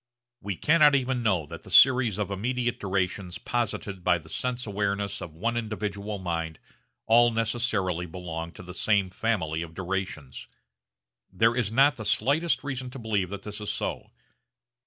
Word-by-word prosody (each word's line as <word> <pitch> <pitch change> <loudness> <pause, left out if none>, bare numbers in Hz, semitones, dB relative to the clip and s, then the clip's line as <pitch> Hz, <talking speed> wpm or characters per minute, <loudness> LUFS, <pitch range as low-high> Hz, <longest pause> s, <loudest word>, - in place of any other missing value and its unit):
We 100 -2 -3
cannot 150 - +5
even 130 -2 0
know 95 -9 +1
that - - -9
the - - -14
series 125 -6 +6
of 105 -2 -2
immediate 120 +4 -1
durations 95 -2 -2
posited 105 -5 -3
by 90 -1 +4
the 80 -1 -14
sense 125 +7 -2
awareness 100 -1 -2
of 80 -3 -8
one 115 +8 -1
individual 105 -2 -3
mind 85 -3 -3 0.5
all 120 +1 +6
necessarily 110 -6 0
belong 85 -1 -6
to - - -11
the 90 0 -9
same 100 -1 +1
family 90 -7 -1
of 80 -1 -8
durations. 90 -7 -4 0.8
There 115 +5 +3
is 115 -4 0
not 135 +4 +4
the 110 - -6
slightest 140 +10 +1
reason 130 -3 -4
to 125 - -9
believe 105 -6 -1
that 100 0 -6
this 105 0 -7
is 105 - -4
so. - - -4
105 Hz, 160 wpm, -27 LUFS, 90-120 Hz, 0.8 s, series